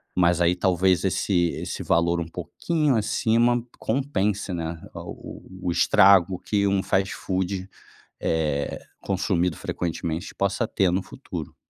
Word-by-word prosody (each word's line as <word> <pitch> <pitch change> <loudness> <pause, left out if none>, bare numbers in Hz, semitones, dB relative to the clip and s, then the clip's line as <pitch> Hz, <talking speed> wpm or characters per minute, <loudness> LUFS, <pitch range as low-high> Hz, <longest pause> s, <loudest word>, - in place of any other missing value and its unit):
mas 85 -1 +3
aí 85 +1 +4
talvez 90 0 +2
esse 90 -2 +1
esse - - -4
valor 85 0 +2
um 80 - -4
pouquinho 140 - -1
acima 115 +2 +2 0.2
compense, 105 -6 -1
né, 80 -1 -4 0.2
o - - -8 0.2
o 90 - +1
o - - +2
estrago 95 0 +5
que 100 -1 0
um 100 -1 +2
fast-food, 95 0 -1 0.5
eh, 75 -3 -1 0.2
consumido 90 -3 0
frequentemente 85 0 -4
possa 100 +4 0
ter 95 -3 +1
no 95 - +1
futuro. 90 - -8
95 Hz, 130 wpm, -25 LUFS, 85-100 Hz, 0.5 s, estrago